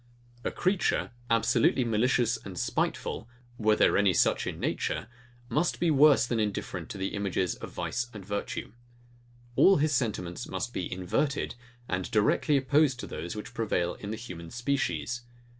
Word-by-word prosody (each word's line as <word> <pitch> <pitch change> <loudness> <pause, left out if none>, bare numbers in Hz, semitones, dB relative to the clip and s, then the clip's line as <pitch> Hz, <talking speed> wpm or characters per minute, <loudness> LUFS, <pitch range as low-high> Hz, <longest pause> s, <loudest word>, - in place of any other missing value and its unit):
A - - 0
creature, 185 +1 0 0.2
absolutely 115 +2 +3
malicious 120 +1 +2
and 95 -3 -8
spiteful, 115 - -2 0.3
were 110 -1 +4
there - - +4
any 100 -4 +3
such - - +2
in - - -4
nature, - - -1 0.4
must 150 +8 0
be 170 -1 +3
worse 145 -3 +6
than 120 -1 -1
indifferent 105 -2 -3
to - - -6
the 95 0 -1
images 95 -3 0
of - - -8
vice 120 0 -2
and 105 -4 -9
virtue. 100 0 -4 0.8
All 195 +9 +6
his 150 +1 +2
sentiments 105 -9 -2
must - - -4
be - - -3
inverted, 95 +11 -1 0.3
and 90 0 -2
directly 125 +7 +3
opposite 140 0 +3
to - - -5
those, 85 +6 -5
which 105 +2 -7
prevail 90 -7 0
in 100 - -8
the 110 - -3
human 90 -7 -8
species. 120 +1 -1
115 Hz, 160 wpm, -29 LUFS, 100-135 Hz, 0.8 s, worse